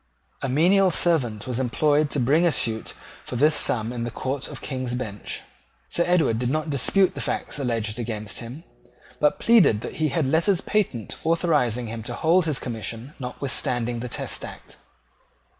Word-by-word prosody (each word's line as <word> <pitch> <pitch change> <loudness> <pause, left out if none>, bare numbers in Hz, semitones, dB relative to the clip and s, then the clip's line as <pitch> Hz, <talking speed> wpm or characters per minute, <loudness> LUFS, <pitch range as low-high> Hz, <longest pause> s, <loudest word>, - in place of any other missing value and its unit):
A 135 - -2
menial 185 +8 +4
servant 130 - +1
was 125 -1 -2
employed 145 +4 +2
to 145 - -1
bring 140 +7 +3
a 170 - +4
suit 110 -6 -1 0.3
for - - -6
this 150 +5 +4
sum 115 -4 +1
in 120 -1 -3
the 120 - -2
Court 130 +3 -3
of - - -7
King's 130 -3 -3
Bench. 110 -5 -5 0.5
Sir 170 - +1
Edward 160 -11 +2
did 125 0 0
not 155 +2 -1
dispute 185 +8 +2
the - - -5
facts - - -3
alleged 115 -4 -2
against 110 -3 -4
him, 125 +7 -8 0.6
but 150 - +2
pleaded 210 - +5
that 120 - -6
he 155 0 +2
had 150 +1 0
letters 170 +7 +2
patent 190 - -1
authorising 150 -8 +1
him 115 0 -5
to 120 +2 -4
hold 165 +5 +3
his 150 -4 +1
commission 115 +3 -5
notwithstanding 125 -2 -2
the 125 +1 -5
Test - - -3
Act. - - -10
130 Hz, 175 wpm, -24 LUFS, 120-160 Hz, 0.6 s, pleaded